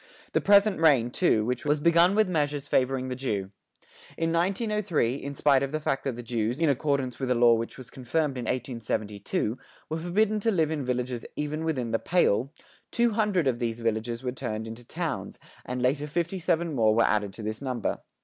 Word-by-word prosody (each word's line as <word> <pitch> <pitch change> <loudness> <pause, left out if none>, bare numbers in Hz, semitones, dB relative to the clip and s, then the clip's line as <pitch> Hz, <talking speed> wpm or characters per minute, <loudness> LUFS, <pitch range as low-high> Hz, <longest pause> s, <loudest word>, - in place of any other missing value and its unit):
The - - +2
present 200 -1 +5
reign, 135 -7 +4
too, 115 -9 +2 0.2
was 150 0 +1
begun 170 +4 +4
with 215 -1 +4
measures 145 -4 -1
favoring 130 -1 +1
the 125 - -3
Jew. 105 -7 -3 0.7
In 165 0 0
1903, 190 - 0
in 140 0 -6
spite 140 -2 +4
of 140 0 -2
the 155 - -1
fact 135 -3 -2
that 135 -4 -1
the 120 - -7
Jews, 115 +2 -2
in 165 -2 +3
accordance 140 -3 0
with 130 -2 -2
a 125 - +3
law 120 0 +6
which 115 0 -2
was 125 -2 -11
confirmed 135 +3 -1
in 125 -2 -4
1872, 110 -3 -2 0.3
were 160 - -1
forbidden 210 +6 +1
to 225 - +1
live 160 -7 +1
in 150 -3 -2
villages 125 -1 -2
even 150 +2 -3
within 130 -8 -1
the 115 - +1
"Pale," 135 - +2 0.4
two 235 -1 +2
hundred 210 -6 +1
of 125 -3 +1
these 115 -1 -2
villages 115 +2 -2
were 125 - -1
turned 110 -3 -4
into 115 +2 -8
towns, - - -4 0.3
and 125 0 -3
later 140 +3 +1
fifty 170 +4 -2
seven 170 -1 0
more 110 -4 +3
were 115 - +4
added 105 -2 +1
to 110 - -9
this 110 +2 -4
number. 130 -5 -2
135 Hz, 195 wpm, -27 LUFS, 120-165 Hz, 0.7 s, law